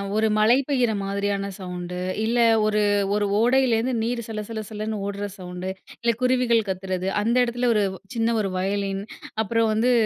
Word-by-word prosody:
ஒரு 220 0 +3
மழை 220 +4 +5
பெய்யிற 250 -5 +2
மாதிரியான 200 0 -1
சவுண்டு. 180 -1 -5 0.3
இல்ல 235 +2 0 0.3
ஒரு 210 0 +2 0.3
ஒரு 205 -1 +1
ஓடையிலருந்து 245 0 +3
நீர் 235 0 -1
சல 215 -1 -3
சல 220 -1 -4
சலன்னு 215 -1 -4
ஓடுற 200 0 -3
சவுண்டு. 180 0 -6 0.3
இல்ல 235 0 +2
குருவிகள் 250 -3 +3
கத்துறது. 185 0 -2
அந்த 230 +3 +1
இடத்துல 240 +1 0
ஒரு 210 -1 +2
வ் - - -12 0.2
சின்ன 230 0 +1
ஒரு 195 -2 -2
வயலின்! 195 +1 -1 0.4
அப்பறம் 225 +1 +1
வந்து 235 +4 +2
215 Hz, 160 wpm, -24 LUFS, 195-235 Hz, 0.4 s, மழை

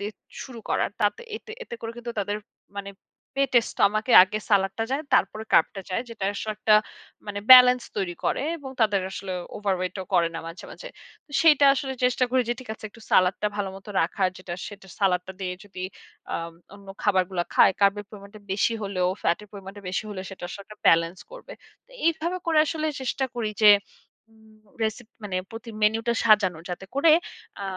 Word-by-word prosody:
দিয়ে 205 +2 -4 0.3
শুরু 245 -3 -10
করার। - - 0
তাত 205 -1 +3 0.2
এতে, 440 - -12
এতে 240 - -8
করে 225 - -5
কিন্তু 240 0 -6
তাদের, 205 +1 -2 0.4
মানে 200 0 -5 0.5
পেটের 260 -4 +3
স্টমাকে 215 +4 +1
আগে 195 +3 -1
সালাদটা 200 +2 +2
যায়, 275 +3 -1
তারপরে 215 +3 +1
কার্বটা 195 - +3
যায়। 185 - -1
যেটা 225 -4 -6
আসলে 215 +2 -3
একটা 215 0 +4 0.5
মানে 205 -1 -4
ব্যালেন্স 250 -1 +9
তৈরি 185 -3 -2
করে - - 0 0.2
এবং 270 -2 -8
তাদের 210 -3 +3
আসলে 190 -1 -6 0.2
ওভারওয়েট 185 -3 -2
ও - - -10
করে 170 -1 +4
না 165 - -4
মাঝে, 165 +2 -9
মাঝে। - - -9 0.4
তো 295 - -27
সেইটা 300 -3 +6
আসলে 265 0 -3
চেষ্টা 250 0 +3
করি 255 -1 +3
যে, - - +2
ঠিক 250 - -13
আছে, 215 - -15
একটু 230 - -17
সালাদটা 185 +3 +3
ভালোমত 195 -1 -5
রাখার 185 +3 +1
যেটা, 185 -2 -6
সেটা 200 -2 -13
সালাদটা 185 -1 +1
দিয়ে 180 -1 -3
যদি 190 -2 -9 0.5
আম 165 0 -4 0.2
অন্য 200 -1 -15
খাবারগুলা 185 -3 +1
খায়। - - +6
কার্বের 200 +1 +3
পরিমাণটা 205 0 -12
বেশি 205 +4 +1
হলেও 185 -2 0
ফ্যাটের 195 +5 0
পরিমাণটা 195 0 -10
বেশি 185 +4 -2
হলে 190 -2 -5
সেটার 180 -2 -7
সঙ্গে 200 +2 -12
ব্যালান্স 165 +2 +4
করবে। - - -11 0.3
তো - - -28 0.2
এইভাবে 335 +2 0
করে 320 -2 +3
আসলে 315 0 -2
চেষ্টা 265 +1 -1
করি 225 -3 -2
যে 210 - +10 0.6
উম 220 -1 -21 0.3
রেসিপি 220 +2 -4
মানে 185 -3 -3
প্রতি 230 +1 -8
মেনুটা 225 +2 +2
সাজানোর 195 -7 +4
যাতে 180 +2 -5
করে 310 +3 +4 0.5
আ - - -5
205 Hz, 180 wpm, -25 LUFS, 190-235 Hz, 0.6 s, যে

